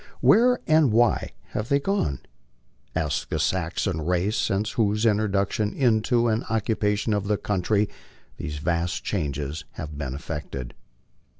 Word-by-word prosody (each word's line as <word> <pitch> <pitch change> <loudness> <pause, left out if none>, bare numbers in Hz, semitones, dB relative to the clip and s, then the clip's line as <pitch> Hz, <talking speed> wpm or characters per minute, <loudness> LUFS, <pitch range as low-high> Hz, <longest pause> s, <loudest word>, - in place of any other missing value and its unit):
Where 250 +2 +5
and 155 -5 +4
why 115 +1 +3 0.2
have 105 +2 -4
they 140 - +4
gone? 140 - -1 0.7
Ask 75 -3 -1
the - - -1
Saxon 80 -3 -1
race, 90 +5 +1
since 105 +2 0
whose 105 0 +1
introduction 105 -1 +1
into 120 -1 +2
and 110 0 +1
occupation 110 -1 0
of 100 -1 -1
the 105 0 +2
country 105 +2 +1 0.5
these 75 0 -5
vast 85 +3 -1
changes 75 -4 -3
have 75 -1 -7
been 65 -3 -3
effected. 70 -4 -6
105 Hz, 130 wpm, -25 LUFS, 80-110 Hz, 0.7 s, Where